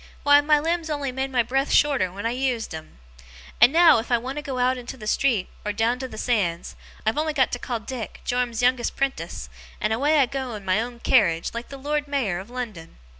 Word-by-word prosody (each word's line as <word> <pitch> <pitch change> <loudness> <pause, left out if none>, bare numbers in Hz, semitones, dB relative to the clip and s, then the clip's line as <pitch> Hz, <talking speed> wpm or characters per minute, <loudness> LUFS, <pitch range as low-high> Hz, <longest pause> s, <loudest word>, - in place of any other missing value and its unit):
Why, 290 0 +6
my 300 +1 +4
limbs 330 +2 -1
only 290 -3 -2
made 265 +1 -2
my 250 -3 +2
breath 270 +4 -1
shorter 275 -11 +3
when 200 +4 -7
I 230 - +1
used 250 -5 -2
'em. 155 - -9 0.6
And 245 - +8
now, 325 -5 +6
if 230 - -6
I 240 - +5
want 260 +4 -6
to - - -2
go 275 -3 -5
out 250 +1 +2
into 250 +1 -8
the 215 - -9
street 220 -3 +1 0.2
or 210 - -1
down 230 +4 0
to 260 - -4
the 250 - -10
sands, 190 -9 -1 0.3
I've 220 +6 +1
only 310 0 0
got 265 -4 +2
to 245 - -3
call 240 -2 -3
Dick, 230 -1 -7
Joram's 245 -1 -1
youngest 250 -1 +2
'prentice, 275 -1 -3 0.3
and 215 +1 0
away 290 +7 +2
I 280 - +5
go 260 -2 -4
in 205 -2 -9
my 190 +3 +2
own 240 0 -7
carriage, 170 -10 +2
like 235 +1 -6
the 275 - -8
Lord 295 +2 -2
Mayor 245 -11 -1
of 195 +4 -10
London. 225 -10 -7
250 Hz, 230 wpm, -24 LUFS, 225-275 Hz, 0.6 s, And